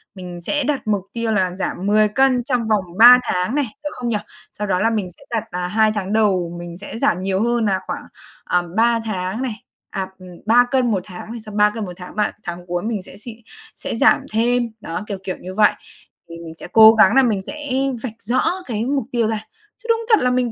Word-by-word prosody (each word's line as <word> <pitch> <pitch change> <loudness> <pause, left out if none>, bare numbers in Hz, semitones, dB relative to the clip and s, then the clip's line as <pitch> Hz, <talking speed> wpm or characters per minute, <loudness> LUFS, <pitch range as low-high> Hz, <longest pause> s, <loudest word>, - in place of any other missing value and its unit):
mình 180 -2 -8
sẽ 290 +11 -1
đặt 275 -4 -2
mục 205 -3 0
tiêu 230 -1 -1
là 185 -4 0
giảm 190 - -3
10 215 +1 +4
cân 255 +2 +2
trong 245 -3 -1
vòng 215 -3 +2
3 245 +3 +10
tháng 180 +8 -1
này, 290 -1 +1 0.2
được 295 - -2
không 245 -1 -4
nhỉ? 220 - +1 0.4
Sau 210 - -4
đó 180 -2 +1
là 225 +4 +2
mình 210 -5 -2
sẽ - - -19
đặt 225 -2 -1
nà 180 0 -3
2 215 +3 +3
tháng 200 -1 -3
đầu 185 -6 +1
mình 175 0 -8
sẽ 205 +3 -8
giảm 180 - +1
nhiều 190 +1 0
hơn 235 -1 +1
nà 195 -2 +1
khoảng, - - -4 0.4
à, 180 - +1 0.2
3 230 0 +3
tháng 190 +1 -3
này, 250 -5 -3 0.3
à, 190 -1 -3
ừm, 185 0 -12 0.2
3 240 +3 +5
cân 255 -3 +2
một 195 -3 0
tháng 190 +3 -9
này, 235 - -6
xong 215 -1 -8
3 210 0 +5
cân 215 0 -5
một 180 - -7
tháng 180 -1 -10
ba 210 0 +1
tháng 175 0 -6
cuối 175 0 -2
mình 215 -3 -3
sẽ 190 - -13
xịn 220 +2 -9 0.4
sẽ - - -5
giảm - - +4
thêm, 240 +2 +1
đó, 170 +3 -5
kiểu, 200 - -4
kiểu, 185 -1 -4
như 185 +1 -9
vậy. 210 0 +5 0.6
Thì 170 - -8
mình 160 0 -9
sẽ - - -10
cố 220 0 +9
gắng 215 -2 +5
nà 270 - +6
mình 215 -5 +1
sẽ 290 +8 -8 0.3
vạch 245 -4 -4
rõ 255 +8 +1
cái 225 -2 -2
mục 275 -2 -1
tiêu 235 -3 +1
ra 220 -1 -3 0.4
chứ 470 - -10
đúng 460 0 +2
thật 435 - +6
là 250 - +3
mình 250 -1 0
215 Hz, 245 wpm, -20 LUFS, 185-240 Hz, 0.6 s, 3